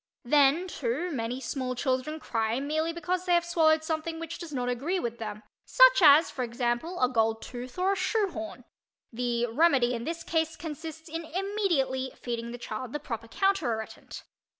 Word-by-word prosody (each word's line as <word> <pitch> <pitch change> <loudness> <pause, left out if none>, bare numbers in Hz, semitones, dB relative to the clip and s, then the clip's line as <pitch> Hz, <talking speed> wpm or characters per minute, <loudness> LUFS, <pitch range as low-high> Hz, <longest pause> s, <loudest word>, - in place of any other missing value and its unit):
Then, 290 +6 +4
too, 300 +3 -2
many 245 -2 -3
small 255 0 -3
children 260 +5 -1
cry 225 -3 -1
merely 310 +4 -1
because 355 +2 -2
they 355 -1 +4
have 345 0 +2
swallowed 315 -2 +3
something 320 +1 -3
which 330 0 -6
does 340 -3 -7
not 250 -3 -2
agree 280 +10 -1
with 235 -6 -4
them, 215 -1 -6 0.2
such - - +6
as, 305 0 +7
for 260 - -5
example, 240 +7 -2
a 255 - +4
gold 225 -2 +1
tooth 245 +2 -8
or 370 +2 +2
a - - +1
shoe 395 +2 +1
horn; 325 0 -7 0.5
the 240 0 0
remedy 250 -1 +3
in 235 -1 -3
this 330 +4 -4
case 325 -1 0
consists 320 +1 -7
in 330 +1 -5
immediately 335 -8 -1
feeding 235 -1 -4
the 245 - -6
child 240 +1 -6
the 295 - -2
proper 230 -5 -6
counter 390 +3 +1
irritant. 220 0 -7
295 Hz, 180 wpm, -28 LUFS, 245-335 Hz, 0.5 s, as